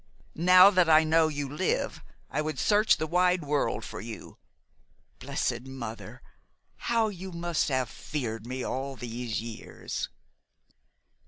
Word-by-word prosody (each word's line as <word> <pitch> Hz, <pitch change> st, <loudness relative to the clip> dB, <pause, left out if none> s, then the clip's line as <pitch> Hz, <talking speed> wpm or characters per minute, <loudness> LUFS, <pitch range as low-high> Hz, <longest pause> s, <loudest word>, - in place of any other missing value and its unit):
Now 180 Hz, +3 st, +7 dB
that 180 Hz, -4 st, +3 dB
I 155 Hz, 0 st, +7 dB
know 160 Hz, 0 st, +4 dB
you 145 Hz, -2 st, -3 dB
live, 150 Hz, +7 st, -1 dB, 0.3 s
I -, -, 0 dB
would 155 Hz, 0 st, -3 dB
search 210 Hz, +1 st, +4 dB
the 155 Hz, -, -2 dB
wide 180 Hz, +1 st, +2 dB
world 145 Hz, 0 st, -1 dB
for -, -, -7 dB
you. -, -, -9 dB, 0.8 s
Blessed 120 Hz, +2 st, -2 dB
Mother! 120 Hz, -4 st, -8 dB, 0.7 s
How 230 Hz, -2 st, +3 dB
you 190 Hz, -1 st, -8 dB
must 170 Hz, -2 st, -1 dB
have 130 Hz, -2 st, 0 dB
feared 115 Hz, -4 st, -5 dB
me 130 Hz, 0 st, -4 dB
all 135 Hz, +1 st, -3 dB
these 120 Hz, -2 st, -4 dB
years!" 115 Hz, -1 st, -6 dB
150 Hz, 135 wpm, -28 LUFS, 130-180 Hz, 0.8 s, Now